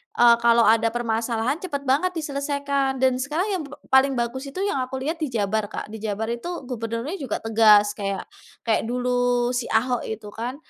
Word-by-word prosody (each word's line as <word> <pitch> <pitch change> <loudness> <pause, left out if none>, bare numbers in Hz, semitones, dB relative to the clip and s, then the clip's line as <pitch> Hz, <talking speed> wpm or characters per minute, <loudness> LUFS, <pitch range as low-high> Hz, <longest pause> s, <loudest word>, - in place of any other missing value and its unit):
eee, 235 -1 +7
kalau 235 0 +4
ada 225 +1 +4
permasalahan 230 +4 -1
cepet 285 -7 -4
banget 285 +8 +2
diselesaikan 280 -2 -1
dan 255 -1 +3
sekarang 310 +9 -1
yang - - -3
p 290 - -12 0.2
paling 265 0 +5
bagus 245 +3 -3
itu 370 +8 -4
yang 400 -10 0
aku 255 +1 -3
lihat 320 +4 -3
di 310 - -1
Jabar, 215 0 0
Kak, 210 - -7
di 220 - -7
Jabar 220 +1 -3
itu 235 +7 -5 0.2
gubernurnya 235 - -4
juga 260 -6 -3
tegas 215 -2 +5
kayak 195 -1 -2 0.4
kayak 225 -1 +1
dulu 245 0 +1
si 245 -1 -2
Ahok 245 +2 0
itu 215 -1 -6
kan. 240 +5 -5
245 Hz, 185 wpm, -24 LUFS, 225-275 Hz, 0.4 s, eee